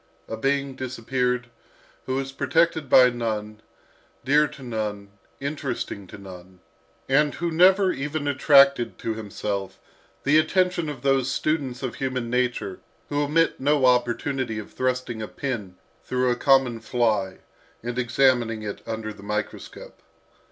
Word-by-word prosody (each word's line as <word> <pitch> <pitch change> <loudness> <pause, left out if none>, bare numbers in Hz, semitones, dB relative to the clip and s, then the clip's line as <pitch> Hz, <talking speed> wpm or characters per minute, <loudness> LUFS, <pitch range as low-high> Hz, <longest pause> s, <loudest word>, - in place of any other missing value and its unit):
A - - -4
being 140 +3 -1
disappeared, 125 -1 -2 0.6
who 130 - -1
was 135 0 -2
protected 160 0 +1
by 125 -1 +7
none, 110 -2 -4 0.6
dear 150 +3 +4
to 140 - -12
none, 105 -4 -4 0.3
interesting 140 -8 -4
to - - -10
none, 95 -2 -12 0.5
and 145 +2 +3
who 170 -1 -2
never 185 +3 +5
even 145 +1 -3
attracted 140 -3 +4
to 115 - -3
himself 100 -3 -4 0.5
the 150 +3 +5
attention 180 0 +1
of 135 -4 -7
those 135 -2 +2
students 140 -4 -1
of 130 - -2
human 130 -3 -3
nature 125 -6 -1 0.3
who 145 0 0
omit 155 +3 +2
no 140 0 +2
opportunity 125 0 +1
of 110 - -8
thrusting 125 -3 -2
a 110 - -4
pin 110 -10 -5 0.3
through 125 -1 0
a - - +1
common 130 -3 +3
fly 110 -4 0 0.5
and 120 +1 -3
examining 120 -3 +2
it 105 -1 -5
under 110 -1 -4
the 100 - -14
microscope. 105 0 -6
125 Hz, 135 wpm, -24 LUFS, 110-140 Hz, 0.6 s, by